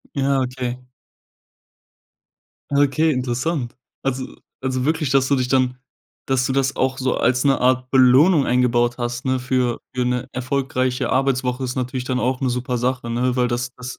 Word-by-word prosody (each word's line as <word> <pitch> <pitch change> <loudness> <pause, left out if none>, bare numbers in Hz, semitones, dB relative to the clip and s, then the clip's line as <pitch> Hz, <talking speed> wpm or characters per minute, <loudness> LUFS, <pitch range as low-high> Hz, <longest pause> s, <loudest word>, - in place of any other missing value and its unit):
Ja, 140 -1 +1
okay. 125 -1 -4 1.9
Okay, 145 +3 +3
interessant. 130 +1 -2 0.3
Also 130 -1 -3 0.3
also 130 -1 -1
wirklich, 155 -2 0
dass 135 -1 +3
du 140 - +3
dich 125 -1 -1
dann 130 -1 +1 0.5
dass 130 -1 +1
du - - -1
das 135 0 0
auch 130 0 0
so 130 -1 0
als 125 +2 +1
'ne 135 -1 +3
Art 130 0 +1
Belohnung 135 +5 +5
eingebaut 120 -1 +2
hast, 120 +1 -3
ne, 130 -1 0
für 125 -1 0
für 125 -1 -1
'ne 125 0 -1
erfolgreiche 130 0 -1
Arbeitswoche, 130 -1 0
ist 125 0 -3
natürlich 125 0 -3
dann 125 -1 -1
auch 125 +2 0
'ne 130 - 0
super 125 0 -2
Sache, 125 -1 -2
ne? 125 +1 0
Weil 125 -1 +1
das 120 0 -2
das 125 0 -8
130 Hz, 165 wpm, -21 LUFS, 125-135 Hz, 1.9 s, Belohnung